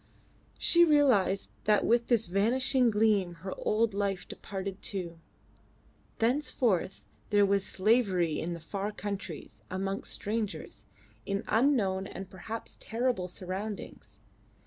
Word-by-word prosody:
She 345 0 +5
realised 260 - +3
that 210 -1 +3
with 235 0 +3
this 230 -3 +3
vanishing 240 +7 +3
gleam 210 -5 +2
her 190 - -3
old 220 0 +1
life 200 -2 -2
departed 195 0 -6
too. 175 -4 -4 1.0
Thenceforth 230 - +1 0.2
there 205 -1 +5
was 200 0 +2
slavery 190 -6 +2
in 170 +2 -3
the 170 - -6
far 200 +5 -4
countries, 200 -6 -6
amongst 195 +1 -3
strangers, 215 0 -4 0.4
in 200 +1 -1
unknown 215 -6 +2
and 190 -1 -8
perhaps 220 +4 -5
terrible 230 -5 -1
surroundings. 190 +3 -6
200 Hz, 115 wpm, -30 LUFS, 190-230 Hz, 1.0 s, She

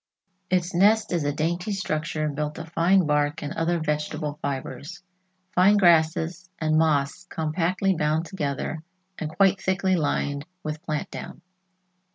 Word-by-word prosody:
Its 180 -1 +1
nest 205 +5 +4
is 170 -3 +1
a 145 - +1
dainty 170 +6 -1
structure 155 -4 -2
built 150 +1 -3
of 165 0 -7
fine 175 +2 +3
bark 150 0 +1
and 145 - -4
other 170 +1 0
vegetable 150 -1 -2
fibers, 140 +5 -5 0.5
fine 195 +3 +5
grasses 170 0 +3
and 155 -1 +1
moss 155 +2 +1
compactly 175 +3 0
bound 155 +1 0
together 155 -3 -3 0.4
and 155 - -3
quite 195 +3 +3
thickly 190 0 +1
lined 145 -2 -1 0.2
with 155 0 -4
plant 155 -3 -3
down. - - -8
160 Hz, 140 wpm, -25 LUFS, 150-180 Hz, 0.5 s, fine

